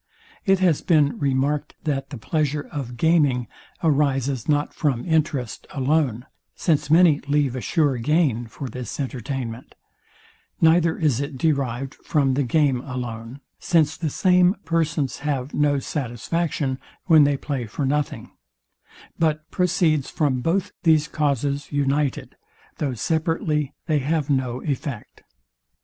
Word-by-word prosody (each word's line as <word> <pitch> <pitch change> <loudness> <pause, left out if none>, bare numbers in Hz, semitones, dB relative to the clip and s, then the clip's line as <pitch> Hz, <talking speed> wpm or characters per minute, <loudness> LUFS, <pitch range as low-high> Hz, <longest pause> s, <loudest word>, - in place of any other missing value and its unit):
It 195 0 +5
has 180 -5 +2
been 150 -5 +2
remarked, 140 +2 0
that 140 -3 -2
the 140 - -7
pleasure 150 +4 -1
of 130 -6 -5
gaming 145 -5 +3 0.4
arises 140 -5 +1
not 145 0 +1
from 135 -6 -1
interest 155 -7 -1
alone; 135 -4 0 0.3
since 150 -3 0
many 160 -2 +6
leave 145 -3 +1
a 130 - -3
sure 145 -4 +1
gain 125 -2 +1
for 135 +4 -7
this 125 +3 -6
entertainment: 130 -3 -5 0.8
Neither 165 0 +4
is 145 -7 +1
it 140 -1 -5
derived 135 -2 -1
from 140 -4 0
the 140 - +1
game 135 -1 +2
alone; 125 -1 -6 0.2
since 160 -3 +2
the 160 -1 -2
same 180 +4 +3
persons 160 -4 0
have 140 -2 -2
no 145 -1 +2
satisfaction, 135 +2 -2 0.3
when 160 -4 +7
they 140 -1 +2
play 135 -5 -4
for 135 +6 -3
nothing: 145 +2 -2 0.9
But 155 -1 0
proceeds 170 -5 +1
from 140 -6 0
both 185 +6 0
these 160 -3 +4
causes 140 -1 -1
united, 145 -1 -1 0.4
though 135 -4 -1
separately 155 +1 -1
they 155 -3 +1
have 145 +1 -1
no 130 -2 -1
effect. 140 -5 -5
145 Hz, 130 wpm, -23 LUFS, 130-155 Hz, 0.9 s, when